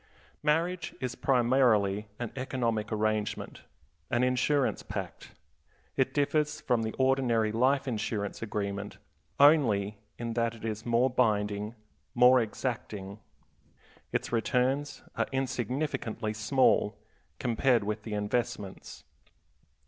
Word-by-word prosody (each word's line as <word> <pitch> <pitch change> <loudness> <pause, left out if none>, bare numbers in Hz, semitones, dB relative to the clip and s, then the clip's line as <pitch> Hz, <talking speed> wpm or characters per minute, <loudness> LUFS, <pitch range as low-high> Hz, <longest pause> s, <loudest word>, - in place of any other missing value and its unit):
Marriage 165 +3 0
is 125 -2 -3
primarily 120 -6 +2
an 120 -2 -4
economic 120 -5 -2
arrangement, 110 -1 -1 0.5
an 120 +1 +2
insurance 130 +2 +1
pact. - - -7 0.6
It 135 -1 +1
differs 150 +1 +1
from 120 -2 +1
the 110 0 -2
ordinary 130 -5 +2
life 135 +5 +2
insurance 105 -3 -2
agreement 100 -2 -3 0.4
only 110 -9 +4 0.2
in 115 -1 -3
that 115 0 0
it 115 - -9
is 110 +1 -4
more 120 +2 +3
binding, 105 -3 0 0.4
more 125 +1 +7
exacting. 105 -3 -4 0.9
Its - - -2
returns 125 +5 0
are - - 0
insignificantly 125 -3 -2
small 110 -1 +2 0.4
compared 120 -1 +2
with 105 +1 -3
the 105 -1 -5
investments. 105 -1 -3
120 Hz, 105 wpm, -29 LUFS, 105-130 Hz, 0.9 s, more